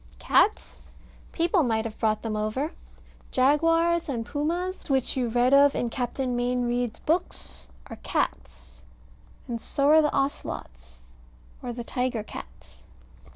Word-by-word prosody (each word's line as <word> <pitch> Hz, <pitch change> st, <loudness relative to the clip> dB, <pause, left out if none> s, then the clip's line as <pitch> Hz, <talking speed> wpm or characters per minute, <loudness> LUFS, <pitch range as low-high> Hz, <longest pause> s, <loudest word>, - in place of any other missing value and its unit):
Cats? 425 Hz, -, +2 dB, 0.5 s
People 340 Hz, +2 st, +2 dB
might 225 Hz, -5 st, 0 dB
have 225 Hz, -1 st, -6 dB
brought 215 Hz, -1 st, +1 dB
them 220 Hz, -2 st, -2 dB
over. 215 Hz, +9 st, -1 dB, 0.6 s
Jaguars 330 Hz, +5 st, +3 dB
and 235 Hz, -4 st, -2 dB
Pumas, 340 Hz, +7 st, -3 dB
which 265 Hz, -2 st, +1 dB
you 255 Hz, -2 st, 0 dB
read 245 Hz, +3 st, +2 dB
of 280 Hz, 0 st, +6 dB
in 235 Hz, -, -1 dB
Captain 250 Hz, +1 st, -2 dB
Mayne 245 Hz, +1 st, 0 dB
Reid's 240 Hz, -1 st, -1 dB
books, 330 Hz, -, -2 dB, 0.2 s
are -, -, -9 dB
cats, -, -, -4 dB, 0.7 s
and 235 Hz, -2 st, -4 dB
so 280 Hz, 0 st, +1 dB
are 315 Hz, +1 st, +7 dB
the 300 Hz, -, +2 dB
Ocelots 60 Hz, -, -4 dB, 0.6 s
or 245 Hz, -, -4 dB
tiger 240 Hz, -1 st, -2 dB
cats. 60 Hz, -, -12 dB
250 Hz, 130 wpm, -26 LUFS, 225-295 Hz, 0.7 s, are